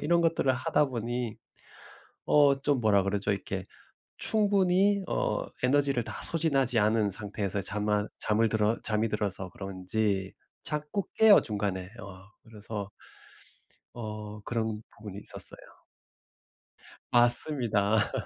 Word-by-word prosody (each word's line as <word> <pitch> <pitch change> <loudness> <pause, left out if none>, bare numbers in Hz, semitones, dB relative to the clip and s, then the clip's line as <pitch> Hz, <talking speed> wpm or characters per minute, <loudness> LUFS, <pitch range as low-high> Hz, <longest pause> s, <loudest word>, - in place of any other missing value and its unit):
이런 170 +3 +1
것들을 165 -5 +1
하다 130 +3 0
보니 120 -2 -4 0.9
어 140 -2 +4
좀 140 -4 0
뭐라 100 -3 +2
그러죠? 100 +1 -1
이렇게 95 -1 -5 0.5
충분히 200 -1 +1
어 - - -2 0.2
에너지를 135 -2 +1
다 - - -8
소진하지 140 -7 +1
않은 105 0 +2
상태에서 100 0 -4
잠만 105 +1 -2
잠을 110 +1 +1
들어 110 +1 0
잠이 110 +1 0
들어서 100 -3 -3
그런지 95 0 -3 0.3
자꾸 150 +6 -4
깨요 220 -2 +6
중간에. 100 -4 -4
어 95 -2 -12 0.2
그래서 105 -2 -8 1.0
어 105 -2 -8
그런 110 -1 -3
부분이 105 -2 -9
있었어요. - - -6 1.3
맞습니다. 120 -4 +6
110 Hz, 255 characters per minute, -28 LUFS, 105-135 Hz, 1.3 s, 깨요